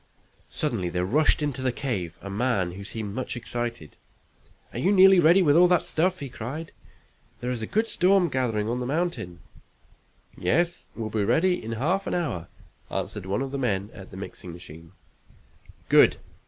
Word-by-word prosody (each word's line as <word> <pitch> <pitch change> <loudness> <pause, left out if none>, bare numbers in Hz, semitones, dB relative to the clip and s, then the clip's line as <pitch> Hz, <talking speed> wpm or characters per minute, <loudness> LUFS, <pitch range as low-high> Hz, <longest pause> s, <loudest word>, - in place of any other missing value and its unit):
Suddenly 115 - -2
there 90 +1 -1
rushed 150 +8 +3
into 140 -3 -2
the 130 -1 +1
cave 105 - -3
a 100 - -6
man 100 -4 0
who 95 +3 -8
seemed 105 0 -5
much 130 +1 -3
excited. 120 -9 -5 0.8
"Are - - -4
you 190 - +2
nearly 190 -1 +7
ready 175 +3 +6
with 145 -3 +4
that 180 -2 +3
stuff?" 185 +2 0
he 140 - -4
cried. 135 +6 -6 0.7
"There's 125 -1 -3
a 110 - -3
good 220 +2 +1
storm 185 -2 +3
gathering 115 -7 -1
on 120 +2 -1
the 125 - -3
mountain!" 130 - -2 0.9
"Yes, 175 +5 0
we'll 110 -2 -4
be 105 -1 0
ready 165 - +2
in 115 +1 -4
half 170 - 0
an - - -1
hour," 115 - -2 0.4
answered 95 0 -4
one 100 +7 0
of 135 - -5
the 140 - -3
men 105 -5 -1
at 95 -2 -11
the 95 - -10
mixing 95 -2 -8
machine. 85 0 -11 0.9
"Good. - - +6
120 Hz, 170 wpm, -26 LUFS, 100-160 Hz, 0.9 s, nearly